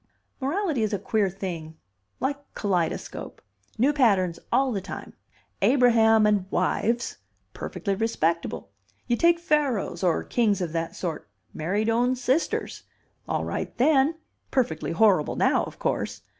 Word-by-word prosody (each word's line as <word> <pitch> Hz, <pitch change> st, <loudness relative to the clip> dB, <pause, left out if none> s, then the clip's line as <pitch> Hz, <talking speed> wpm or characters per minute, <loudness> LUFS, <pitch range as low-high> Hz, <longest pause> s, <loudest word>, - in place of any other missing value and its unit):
"Morality 305 Hz, -, -1 dB
is 215 Hz, -1 st, 0 dB
queer 210 Hz, -1 st, +1 dB
thing. 170 Hz, -4 st, -6 dB, 0.4 s
Like 285 Hz, +1 st, -4 dB
kaleidoscope. 180 Hz, -6 st, -2 dB, 0.4 s
New 270 Hz, +6 st, +3 dB
patterns 195 Hz, -, +2 dB
all 265 Hz, 0 st, +3 dB
the 200 Hz, -4 st, -2 dB
time. 195 Hz, -, -8 dB, 0.5 s
Abraham 225 Hz, -4 st, +5 dB
and 205 Hz, -3 st, +1 dB
wives 235 Hz, +4 st, 0 dB, 0.4 s
perfectly 200 Hz, -, -3 dB
respectable. 170 Hz, -6 st, -1 dB, 0.3 s
You 240 Hz, -, +1 dB
take 340 Hz, +6 st, +4 dB
Pharaohs 300 Hz, -, 0 dB
or 175 Hz, -3 st, +2 dB
kings 215 Hz, -5 st, +1 dB
of 175 Hz, -4 st, -2 dB
that 165 Hz, 0 st, -2 dB
sort 160 Hz, -, -5 dB, 0.2 s
married 200 Hz, +8 st, -1 dB
own 240 Hz, +3 st, +2 dB
sisters. 255 Hz, +5 st, -1 dB, 0.5 s
All -, -, -1 dB
right -, -, -4 dB
then. 285 Hz, +3 st, +4 dB, 0.3 s
Perfectly 235 Hz, -, 0 dB
horrible 185 Hz, -4 st, +3 dB
now, -, -, +2 dB
of -, -, -10 dB
course. -, -, -2 dB
220 Hz, 130 wpm, -26 LUFS, 185-260 Hz, 0.5 s, Abraham